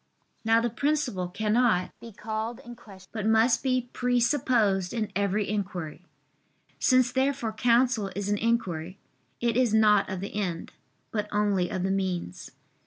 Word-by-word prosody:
Now 225 0 +4
the 235 0 -1
principle 260 -8 -1
cannot 215 0 +1
be 230 - -10
called 220 +3 -4
in 240 0 -9
question, 195 -5 -15
but 215 -2 -2
must 225 +2 +4
be 255 -2 -1
presupposed 240 -6 +1
in 215 -2 -2
every 200 +1 0
inquiry. 185 -6 -4 0.8
Since 255 -1 +3
therefore 260 -3 0
counsel 235 -2 +2
is 200 0 -3
an 205 0 0
inquiry, 185 -6 -1 0.4
it 235 -1 +1
is 245 -3 +2
not 210 -2 +4
of 190 -1 -4
the 195 - -6
end, 180 -5 -3 0.4
but 210 -1 -2
only 205 -4 +1
of 185 - -3
the 190 - 0
means. 185 - -3
215 Hz, 150 wpm, -27 LUFS, 195-240 Hz, 0.8 s, Now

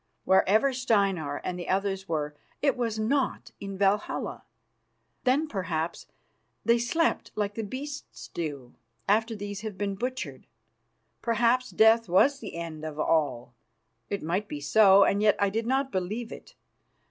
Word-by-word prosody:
Wherever 215 +8 +4
Steinar 195 - 0
and 180 0 -3
the 175 - -6
others 195 -1 -1
were, 150 -2 -2 0.2
it 280 -2 +2
was 230 -3 -2
not 255 +5 -1
in 195 -1 -6
Valhalla. 200 +1 0 0.8
Then, 275 +5 +3
perhaps, 170 - -3 0.6
they 235 0 +4
slept 320 +8 0
like 205 -1 -1
the 225 - -3
beasts 280 +7 -7
do 145 -7 -5 0.3
after 220 +3 +2
these 205 0 -6
have 215 -3 -6
been 200 0 -1
butchered. 200 - -5 0.7
Perhaps 235 +2 +2
death 220 -1 +4
was 270 +11 +4
the 215 - -8
end 165 -2 -6
of 155 -1 -6
all. 135 -7 0 0.6
It 200 - -3
might 180 +6 -1
be 150 - -5
so, 195 +6 +6
and 200 +1 +2
yet 210 -1 +5
I 200 -1 +1
did 225 +2 -2
not 265 +1 +1
believe 215 +5 -3
it. - - -11
205 Hz, 145 wpm, -28 LUFS, 175-235 Hz, 0.8 s, so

